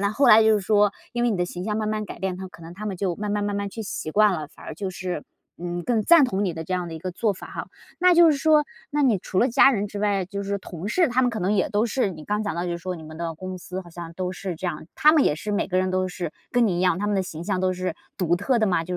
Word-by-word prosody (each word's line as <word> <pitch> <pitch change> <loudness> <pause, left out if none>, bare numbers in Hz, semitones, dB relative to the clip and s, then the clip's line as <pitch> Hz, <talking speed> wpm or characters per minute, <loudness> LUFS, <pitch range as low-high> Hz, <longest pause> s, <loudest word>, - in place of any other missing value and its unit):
但 200 +1 +1
后 270 +3 +3
来 220 0 +9
就 220 0 +5
是 210 - +1
说 205 +1 +3 0.2
因 240 - -1
为 240 - +3
你 210 - 0
的 180 - +1
形 180 0 -6
象 210 0 -1
慢 215 -1 -1
慢 215 0 -1
改 200 - -9
变， 190 0 -2
他 190 +1 -6
可 170 - -15
能 165 - -9
他 210 +3 -6
们 195 -3 -3
就 180 -1 -1
慢 210 0 -3
慢 205 0 0
慢 205 0 -1
慢 200 0 -2
去 225 - -6
习 195 -6 -5
惯 210 +4 +4
了， 155 -3 -4
反 - - -16
而 - - -6
就 195 -2 -4
是， 180 -4 -4 0.3
嗯， 175 0 -4
更 230 +2 +1
赞 335 +4 +7
同 200 -5 0
你 185 - 0
的 160 0 -5
这 185 - -2
样 180 -1 -2
的 165 - -7
一 - - -6
个 185 +3 -4
做 205 +4 0
法 190 - -10
哈。 - - -6 0.3
那 360 0 +5
就 340 -1 +7
是 295 - +1
说 305 +1 +4 0.3
那 295 0 +1
你 235 -8 +3
除 185 - -3
了 245 - +4
家 270 +2 +6
人 205 -4 -1
之 205 - -6
外， 200 -2 +1
就 200 +1 -5
是 200 0 -2
同 180 -1 -8
事， 330 - +2
他 255 +1 +2
们 250 - +2
可 220 -2 -4
能 190 +3 +1
也 195 - +1
都 210 +2 +2
是， 235 -3 0
你 155 -4 -9
刚 210 +4 -1
讲 205 -6 -2
到 170 +1 -2
就 175 - -2
是 170 - -3
说 185 +2 -4
你 165 - -9
们 155 0 -10
的 165 0 -4
公 185 +3 -6
司 180 +1 -6
好 180 - -13
像 170 0 -8
都 185 +1 -3
是 185 -1 -5
这 175 +3 -5
样， 155 -3 -4
他 305 0 +5
们 305 -4 +4
也 - - +3
是 185 +7 -5
每 205 - 0
个 185 -1 0
人 185 0 +1
都 185 0 +1
是 175 -2 -4 0.2
跟 245 -1 +4
你 185 -4 0
一 - - -1
样， 180 -1 +2
他 205 - -1
们 205 - +1
的 190 - +1
形 165 -3 -7
象 190 0 -1
都 185 0 +1
是 185 0 -3 0.2
独 175 -2 +2
特 235 +7 +1
的 220 - +2
吗？ 175 -4 +1
就 180 +1 -3
195 Hz, 360 characters per minute, -24 LUFS, 180-215 Hz, 0.3 s, 来